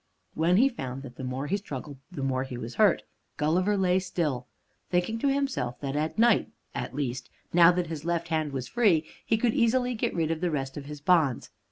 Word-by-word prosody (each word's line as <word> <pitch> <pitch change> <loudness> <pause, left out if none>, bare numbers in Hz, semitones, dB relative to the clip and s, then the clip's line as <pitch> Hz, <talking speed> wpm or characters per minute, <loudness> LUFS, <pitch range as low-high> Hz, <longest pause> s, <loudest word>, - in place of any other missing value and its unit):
When 170 +3 +3
he 255 +5 +6
found 135 - -5
that 125 -2 -10
the - - -6
more 130 +2 -3
he 195 +7 0
struggled 145 -7 -7
the 145 -7 -5
more 130 -1 0
he 130 -2 -6
was 120 0 -6
hurt, - - +4 0.3
Gulliver 180 +7 +2
lay 185 -1 +3
still, 155 -9 -2 0.4
thinking 180 +6 0
to 280 - +1
himself 275 - -1
that 140 -1 -3
at 155 +5 -1
night 230 -1 +4 0.2
at 120 +1 -4
least, 130 -3 -3 0.2
now 170 0 +8
that 180 0 0
his 160 -3 -6
left 170 0 -1
hand 155 -2 0
was 130 -2 -4
free, 195 -10 +3 0.2
he 225 - +1
could 230 0 +1
easily 245 +2 +2
get 225 - -2
rid 165 -2 0
of 165 0 -2
the 180 - +1
rest 135 -4 -3
of 145 - -6
his 150 0 -8
bonds. 155 -6 +2
160 Hz, 215 wpm, -28 LUFS, 135-190 Hz, 0.4 s, now